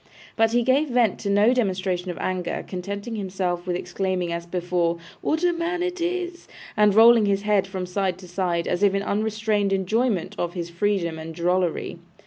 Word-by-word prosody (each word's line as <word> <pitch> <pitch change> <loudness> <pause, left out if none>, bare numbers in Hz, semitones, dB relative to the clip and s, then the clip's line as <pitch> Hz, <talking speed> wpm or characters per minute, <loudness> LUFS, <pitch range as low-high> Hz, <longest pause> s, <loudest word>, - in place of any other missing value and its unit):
But 225 -1 +3
he 240 +1 +2
gave 275 +5 +2
vent 240 -5 +2
to 200 - -3
no 205 +4 +4
demonstration 185 -6 -1
of 175 - -4
anger, 185 -1 -2
contenting 200 +5 -5
himself 185 -3 -3
with 180 - 0
exclaiming 180 -1 -2
as 170 0 -5
before, 175 -1 0 0.2
'What 320 +3 0
a 350 -1 +3
man 340 +1 -2
it 360 -1 -3
is!' 350 0 -3 0.3
and 210 -2 +4
rolling 225 -1 +7
his 200 0 +1
head 205 -2 +2
from 190 -1 -4
side 185 0 -1
to 185 -1 -12
side, 175 -1 -1
as 180 - -1
if 200 -1 +4
in 195 - 0
unrestrained 215 -1 0
enjoyment 195 +1 0
of 175 +1 -2
his 170 -1 -4
freedom 170 -3 -1
and 160 0 -7
drollery. 175 0 -1
195 Hz, 185 wpm, -24 LUFS, 180-225 Hz, 0.3 s, rolling